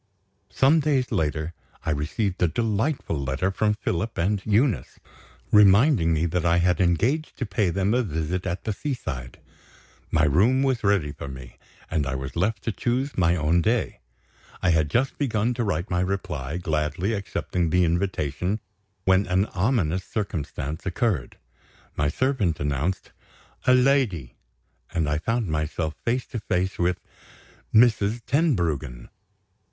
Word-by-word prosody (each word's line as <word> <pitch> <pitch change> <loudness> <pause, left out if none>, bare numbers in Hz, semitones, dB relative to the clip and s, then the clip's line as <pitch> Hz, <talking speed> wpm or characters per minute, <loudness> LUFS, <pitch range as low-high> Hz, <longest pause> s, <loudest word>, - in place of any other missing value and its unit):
Some 145 +5 +4
days 140 -4 +1
later, 80 +1 -1 0.3
I 80 - +1
received 80 +7 -2
a 90 - +5
delightful 110 - -1
letter 70 +8 -1
from 105 +2 +1
Philip 105 0 -3
and 95 +4 +1
Eunice; 110 +3 +1 0.5
reminding 105 - +5
me 80 +1 +1
that 85 0 -1
I 85 0 +3
had 90 -1 +2
engaged 115 - +1
to 130 - -2
pay 100 -1 0
them 95 +4 +1
a 125 - +3
visit 90 -1 -3
at 90 0 -3
the 110 - -2
seaside. 80 - -5 0.7
My 80 -2 +2
room 105 - +3
was 130 -4 0
ready 100 -8 +2
for 70 - -8
me, 65 -3 -10 0.3
and 75 -3 0
I 70 - -2
was 65 +1 -5
left 100 +6 0
to 115 - -1
choose 125 +6 -1
my 85 -2 +3
own 80 +1 +2
day. 115 +5 0 0.6
I 90 - +4
had 80 -2 +2
just 130 - 0
begun 120 -4 +1
to 120 0 -2
write 85 -3 -2
my 90 - +1
reply, 85 -6 -3
gladly 80 +4 -1
accepting 90 -4 -2
the 90 +2 +3
invitation, 85 +2 -1 0.5
when 95 +1 +3
an 90 +2 +2
ominous 95 - +1
circumstance 80 -6 -4
occurred. 95 - -1 0.6
My 75 - +1
servant 105 - 0
announced 75 +5 -2 0.6
"a 125 - +7
lady"; 125 - +2 0.6
and 80 -3 0
I 75 0 0
found 115 +5 -1
myself 80 +1 -2
face 125 +2 0
to 115 - -4
face 95 -2 -1
with 90 +1 +1 0.7
Mrs. 110 -1 +4
Tenbruggen! 85 - 0
90 Hz, 145 wpm, -25 LUFS, 80-115 Hz, 0.7 s, a